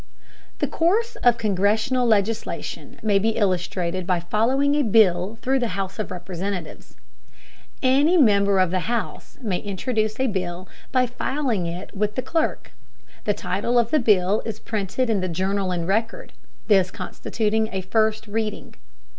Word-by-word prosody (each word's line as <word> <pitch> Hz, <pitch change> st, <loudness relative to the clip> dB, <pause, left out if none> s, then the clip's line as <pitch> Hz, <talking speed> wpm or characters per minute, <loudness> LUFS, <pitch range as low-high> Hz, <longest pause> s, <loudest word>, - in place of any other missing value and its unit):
The -, -, 0 dB
course 415 Hz, +8 st, +1 dB
of 240 Hz, -1 st, +3 dB
congressional 220 Hz, +5 st, +1 dB
legislation 215 Hz, 0 st, -1 dB
may 205 Hz, -2 st, +3 dB
be 220 Hz, +2 st, 0 dB
illustrated 185 Hz, -2 st, -1 dB
by 180 Hz, -2 st, +2 dB
following 245 Hz, +11 st, +1 dB
a 295 Hz, -, +3 dB
bill 210 Hz, -4 st, +3 dB
through 265 Hz, +1 st, +2 dB
the 225 Hz, -6 st, -2 dB
House 195 Hz, +1 st, -4 dB
of 215 Hz, -, -3 dB
Representatives. 180 Hz, -1 st, -6 dB, 0.9 s
Any 285 Hz, +7 st, +4 dB
member 200 Hz, -, +4 dB
of 185 Hz, -2 st, +3 dB
the 185 Hz, +2 st, -1 dB
House 235 Hz, -2 st, -4 dB
may 195 Hz, -5 st, -1 dB
introduce 215 Hz, +2 st, -2 dB
a 260 Hz, -, +2 dB
bill 185 Hz, -5 st, -3 dB, 0.2 s
by 255 Hz, -1 st, +3 dB
filing 250 Hz, -, -2 dB
it 175 Hz, +5 st, -7 dB
with 210 Hz, +1 st, -1 dB
the 255 Hz, -, -2 dB
clerk. 320 Hz, +4 st, -1 dB, 0.5 s
The 205 Hz, -, +1 dB
title 205 Hz, +7 st, -1 dB
of 235 Hz, -1 st, +2 dB
the 310 Hz, -, +4 dB
bill 205 Hz, -3 st, +3 dB
is 220 Hz, -2 st, -5 dB
printed 215 Hz, +3 st, -2 dB
in 215 Hz, -4 st, +1 dB
the 185 Hz, -, -2 dB
Journal 190 Hz, +3 st, -1 dB
and 170 Hz, -2 st, -2 dB
Record, 220 Hz, +4 st, -1 dB, 0.3 s
this 195 Hz, -4 st, +4 dB
constituting 220 Hz, +2 st, -2 dB
a 190 Hz, -, -2 dB
first 220 Hz, +3 st, +1 dB
"reading." 215 Hz, 0 st, -3 dB
210 Hz, 155 wpm, -23 LUFS, 185-235 Hz, 0.9 s, Any